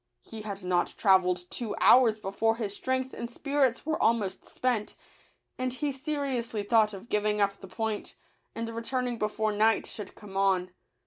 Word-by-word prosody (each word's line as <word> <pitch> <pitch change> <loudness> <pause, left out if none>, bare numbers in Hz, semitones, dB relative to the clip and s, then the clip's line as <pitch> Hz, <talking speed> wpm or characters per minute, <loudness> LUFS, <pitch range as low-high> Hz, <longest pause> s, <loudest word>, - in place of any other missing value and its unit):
He 220 -1 -8
had 200 -2 -6
not 180 -1 0
travelled 180 -3 +3
two 230 -4 -3
hours 240 -4 +6
before 215 +2 0
his 210 -3 -3
strength 260 +2 -2
and 235 - -5
spirits 275 0 0
were 315 0 -1
almost 215 -5 +1
spent; 240 -5 -2 0.6
and 255 0 0
he 285 +3 -1
seriously 270 -6 -2
thought 215 0 +4
of 200 +2 -9
giving 210 -1 +1
up 200 -1 +2
the 195 - -10
point, 220 +1 -3 0.4
and 230 0 -3
returning 240 +1 -2
before 215 0 0
night 220 +2 +3
should 205 -3 -7
come 205 -3 -12
on. 190 -2 +2
220 Hz, 165 wpm, -29 LUFS, 200-245 Hz, 0.6 s, hours